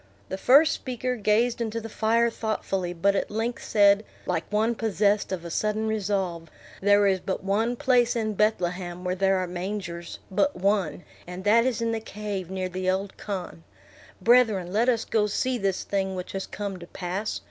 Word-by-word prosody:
The 190 - -3
first 290 +8 +6
speaker 255 0 -3
gazed 230 +2 +1
into 230 0 -2
the 225 - -7
fire 230 +2 +2
thoughtfully, 195 -5 -2
but 195 +3 +1
at - - -1
length 225 +3 -3
said, 205 0 +4 0.2
like - - -2
one 220 +3 +2
possessed 210 -2 +1
of 175 -3 -4
a 170 - -6
sudden 215 +4 0
resolve, 195 -6 -2 0.3
"There 205 +1 +5
is 190 -1 +3
but 190 +1 -4
one 220 +5 +1
place 250 -3 +3
in 215 -2 -1
Bethlehem 180 -4 -1
where 180 0 -1
there 195 +1 +2
are 185 - 0
mangers; 175 -1 -5
but 285 +10 +1
one, 185 -4 0 0.2
and 180 +1 -7
that 225 +4 +4
is 240 -2 -1
in 230 - 0
the 225 - -1
cave 205 -4 -5
near 185 -1 -2
the 185 +1 -2
old 190 +1 -1
khan. 185 -5 -6 0.6
Brethren, 215 -5 +3
let 230 +4 +3
us 230 -3 +1
go 210 -2 +1
see 250 +4 -1
this 195 -2 -1
thing 190 -1 -1
which 180 -1 -5
has 195 0 -4
come 200 -2 -5
to 170 - -10
pass. 190 +4 -4
205 Hz, 185 wpm, -26 LUFS, 185-225 Hz, 0.6 s, first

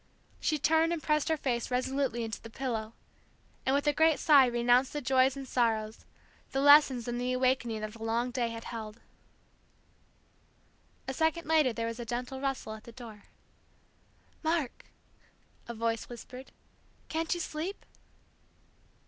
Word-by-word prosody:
She 310 - 0
turned 320 +3 +3
and 335 -2 -3
pressed 300 -1 +1
her 320 - +2
face 245 -5 -2
resolutely 255 -1 -1
into 225 -1 -5
the 225 - -10
pillow, 225 -3 -4 0.7
and 265 - +3
with 285 - 0
a 295 - +3
great 320 0 +4
sigh 285 -5 +6
renounced 245 +2 +2
the 295 - -2
joys 260 0 +2
and 270 -1 -7
sorrows, 225 -3 -1 0.5
the 270 - +1
lessons 280 -4 +6
and 240 0 -2
the 250 0 -1
awakening 255 -3 0
that 215 0 -5
the 230 - -13
long 230 +2 -1
day 240 -1 0
had 230 0 -7
held. 220 -1 -7 2.1
A 265 - -2
second 320 +3 0
later 310 -5 +4
there 230 0 -3
was 230 +1 -4
a 240 - -5
gentle 245 +3 -4
rustle 270 -5 -3
at 220 0 -11
the 235 - -10
door. 225 -4 -11 1.2
"Mark 320 -5 -1 0.4
" - - -34
a - - -3
voice 230 0 -2
whispered. 250 +2 -10 0.6
"Can't 325 +2 -1
you - - -5
sleep?" 335 +4 -5
255 Hz, 155 wpm, -30 LUFS, 230-290 Hz, 2.1 s, sigh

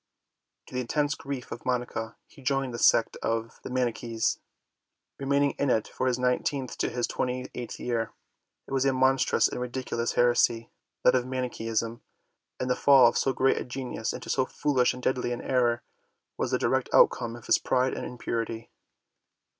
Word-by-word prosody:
To - - -16
the 125 - -1
intense 145 +4 0
grief 140 -3 -6
of 115 - -7
Monica, 120 -2 -2
he - - -18
joined 135 -1 0
the 120 - -4
sect 115 - +4
of 115 0 -2
the - - -7
Manichees, 120 -2 -1 0.8
remaining 140 +1 +2
in 140 - +1
it 110 -3 +2
from 130 - -2
his 125 -1 +1
nineteenth 125 +1 -1
to - - +1
his 120 -1 -1
twenty 125 +1 -3
eighth 120 -2 -6
year. 115 -2 -2 0.5
It - - -15
was 135 -1 +2
a 135 -1 +2
monstrous 130 +1 +3
and 125 - -5
ridiculous 125 -1 -2
heresy, 120 -1 +2 0.3
that 125 - +6
of 125 -1 +1
Manicheism, 115 -3 -2 0.6
and 130 - -2
the 125 - +2
fall 135 -2 +7
of - - -7
so 135 - +2
great 130 0 +2
a - - -2
genius 125 -3 -4
into - - -5
so 130 - +2
foolish 130 -5 +1
and 125 - -10
deadly 125 -1 0
an 120 - -5
error 120 -2 +1 0.5
was - - -1
the - - +2
direct - - 0
outcome 120 -2 +4
of 120 - -12
his - - +4
pride 130 0 +1
and - - -4
impurity. 115 -2 -4
125 Hz, 180 wpm, -28 LUFS, 120-130 Hz, 0.8 s, fall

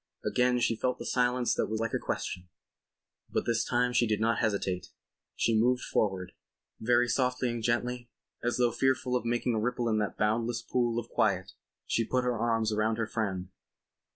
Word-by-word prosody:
Again 125 0 +2
she 115 -1 +2
felt 125 +3 -1
the - - -7
silence 125 -1 +1
that - - 0
was 110 0 -2
like 115 -1 -2
a - - +1
question. 90 -1 -4 0.8
But - - -1
this 115 -1 +1
time 125 0 +1
she 120 -1 +3
did 105 -1 0
not 115 +1 +2
hesitate. 100 -5 -1 0.5
She 115 - +2
moved 125 +3 +3
forward. 95 -3 -1 0.5
Very 120 +2 +3
softly 125 -1 +1
and 120 -1 -4
gently, 120 +1 -1 0.3
as 120 0 0
though 120 -1 +3
fearful 130 +1 +1
of 125 - -1
making 120 +1 0
a 110 - +1
ripple 120 +1 -1
in 110 -1 +2
that 105 - -2
boundless 115 +2 0
pool 120 -2 0
of 120 0 -3
quiet - - +1 0.3
she 115 - +1
put 125 +3 0
her 125 -1 0
arms 115 -1 +1
round 110 +1 +1
her 115 - 0
friend. 95 -5 -3
120 Hz, 185 wpm, -30 LUFS, 110-125 Hz, 0.8 s, she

